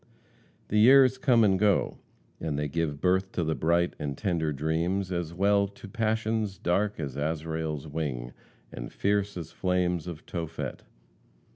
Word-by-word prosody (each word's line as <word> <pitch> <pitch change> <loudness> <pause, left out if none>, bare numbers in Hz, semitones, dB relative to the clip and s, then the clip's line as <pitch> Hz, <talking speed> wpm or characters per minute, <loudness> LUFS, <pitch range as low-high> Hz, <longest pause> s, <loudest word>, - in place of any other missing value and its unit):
The 105 - +2
years 130 +2 +7
come 120 -4 +4
and 95 -3 +3
go, 105 -2 +2 0.4
and 75 -3 -2
they 75 0 -1
give 75 -1 -2
birth 95 +2 +1
to 85 - 0
bright 85 +2 +1
and 70 -2 -3
tender 85 -5 0
dreams, 85 +6 -1
as 85 -2 -2
well 100 +3 +3
as - - -6
to 125 -5 -10
passions 110 -1 -1
dark 100 +4 0
as 70 -4 -4
Azrael's 80 0 -2
wing, 70 -6 -4 0.4
and - - -7
fierce 100 -1 0
as 85 -2 -6
flames 90 -2 0
of 85 -2 -7
Tophet. 80 -2 -5
90 Hz, 150 wpm, -28 LUFS, 80-100 Hz, 0.4 s, years